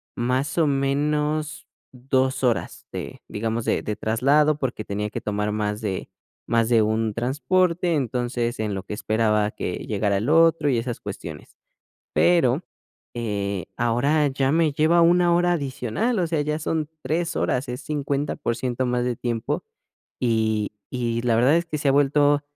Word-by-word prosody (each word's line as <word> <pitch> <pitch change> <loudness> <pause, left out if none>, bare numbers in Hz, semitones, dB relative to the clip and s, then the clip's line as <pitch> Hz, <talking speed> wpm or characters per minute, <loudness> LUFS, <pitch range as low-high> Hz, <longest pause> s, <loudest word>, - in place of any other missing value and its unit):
más 130 +7 0
o 155 - +4
menos 150 +2 0 0.3
2 130 +1 0
horas 120 -3 -1
de, - - -7
digamos, 115 +2 -3
de - - +1
de 105 - -3
traslado, 145 +7 +2
porque 120 -5 -3
tenía 105 +1 -3
que - - -5
tomar 105 0 -1
más 105 0 -2
de 95 -3 -3 0.4
más 115 -1 +1
de 115 -2 +5
un 110 0 0
transporte, 170 +7 +1
entonces 120 -2 -1
en 105 -2 -1
lo 95 - -4
que 100 - -7
esperaba 105 0 +1
que 90 - -4
llegara 100 -1 0
el 110 +7 -1
otro 165 -1 +4
y 125 - +2
esas 120 0 -3
cuestiones. 85 -7 -8 0.6
Pero, 165 -4 +3 0.5
eh, 100 -5 -2
ahora 135 +6 +2
ya 135 0 0
me 160 -2 +3
lleva 160 +4 +3
una 175 +1 +4
hora 175 0 +3
adicional, 145 - -1
o 175 - +1
sea, 160 -2 0
ya 150 +1 -1
son 160 -1 -2
3 165 +2 -1
horas, 125 +1 0
es 125 - -5
50% 140 -4 -2
más 125 0 0
de 125 -1 -1
tiempo, 115 -1 -2 0.6
y 110 -3 +1 0.2
y 120 -2 -1
la 120 -1 +2
verdad 125 +7 +4
es 170 0 +1
que 155 - -3
se 145 - -2
ha - - +6
vuelto 145 +1 +3
130 Hz, 160 wpm, -24 LUFS, 110-150 Hz, 0.6 s, ha